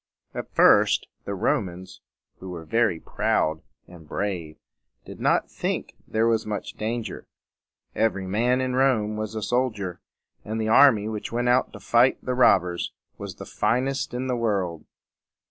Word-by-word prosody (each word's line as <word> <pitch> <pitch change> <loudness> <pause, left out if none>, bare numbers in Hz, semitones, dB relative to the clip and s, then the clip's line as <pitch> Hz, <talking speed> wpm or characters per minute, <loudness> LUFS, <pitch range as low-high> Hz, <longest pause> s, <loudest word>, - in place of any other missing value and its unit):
At - - -6
first - - +5 0.2
the 100 - -3
Romans, 95 -6 -2 0.4
who 95 - -8
were 85 -2 -7
very 110 -1 +1
proud 80 0 0 0.3
and 85 -3 -14
brave, 90 -6 -3 0.5
did - - -10
not - - +1
think - - -3
there 110 +1 +1
was 115 -1 +2
much 105 -1 -5
danger. 115 +1 -4 0.7
Every 110 -3 0
man 120 +7 +1
in 130 -1 -1
Rome 120 -5 +2
was 110 0 -4
a 110 - -3
soldier, 110 -8 -1 0.4
and 110 +1 -4
the 110 0 -1
army 115 -4 +6
which 110 -1 -5
went 120 +1 0
out 125 +1 +3
to - - -9
fight 120 +3 +3
the 125 - 0
robbers 95 -8 +3 0.3
was - - -6
the - - -9
finest 135 +3 -1
in 125 +1 -2
the 130 -1 0
world. 100 -8 -1
110 Hz, 155 wpm, -25 LUFS, 95-125 Hz, 0.7 s, army